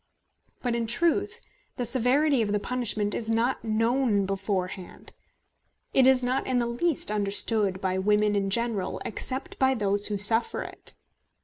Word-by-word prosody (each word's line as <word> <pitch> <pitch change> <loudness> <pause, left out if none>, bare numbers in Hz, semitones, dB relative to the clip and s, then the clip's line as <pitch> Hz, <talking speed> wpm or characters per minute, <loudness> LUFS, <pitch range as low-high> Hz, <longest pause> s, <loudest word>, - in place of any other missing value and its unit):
But 245 -2 -1
in 230 -1 -2
truth 340 - 0 0.3
the 245 - -3
severity 260 +3 +2
of 210 -2 -1
the 210 - +1
punishment 215 -3 -1
is 225 - -4
not 230 +3 0
known 225 -1 +1
beforehand; 190 -1 -5 0.8
it 260 -1 +5
is 260 -1 +4
not 255 +2 -1
in 255 - 0
the 240 - +1
least 240 +2 0
understood 205 -1 +2
by 185 -1 -2
women 210 +1 +2
in 195 -1 -1
general, 225 -2 -1
except 260 +4 -2
by 265 0 +3
those 205 -2 +2
who 205 - -2
suffer 225 +3 +2
it. - - -7
225 Hz, 150 wpm, -26 LUFS, 205-250 Hz, 0.8 s, it